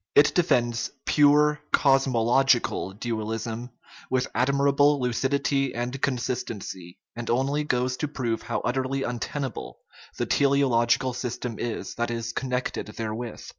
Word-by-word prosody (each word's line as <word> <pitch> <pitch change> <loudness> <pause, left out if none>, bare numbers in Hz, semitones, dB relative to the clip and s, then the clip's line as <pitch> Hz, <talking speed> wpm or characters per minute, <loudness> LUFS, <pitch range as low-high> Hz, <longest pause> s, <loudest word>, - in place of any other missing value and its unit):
It 145 - +6
defends 120 -9 +1 0.2
pure 150 0 +4
cosmological 135 -5 +3
dual 110 0 -3
ism 115 +2 -4 0.4
with 130 0 +1
admirable 140 +2 +3
lucidity 135 +2 0
and 125 +3 -3
consistency, 120 -9 -3 0.2
and 120 0 -5
only 135 +5 +1
goes 125 -2 0
to 150 - -1
prove 120 -6 -2
how 115 - -3
utterly 130 +2 -1
untenable 125 +1 -4 0.4
the - - 0
teleological 130 -2 +2
system 120 -2 -4
is 120 -2 -4
that 120 0 -1
is 115 0 -3
connected 125 -3 -2
therewith. 115 +1 -4
125 Hz, 120 wpm, -26 LUFS, 115-140 Hz, 0.4 s, It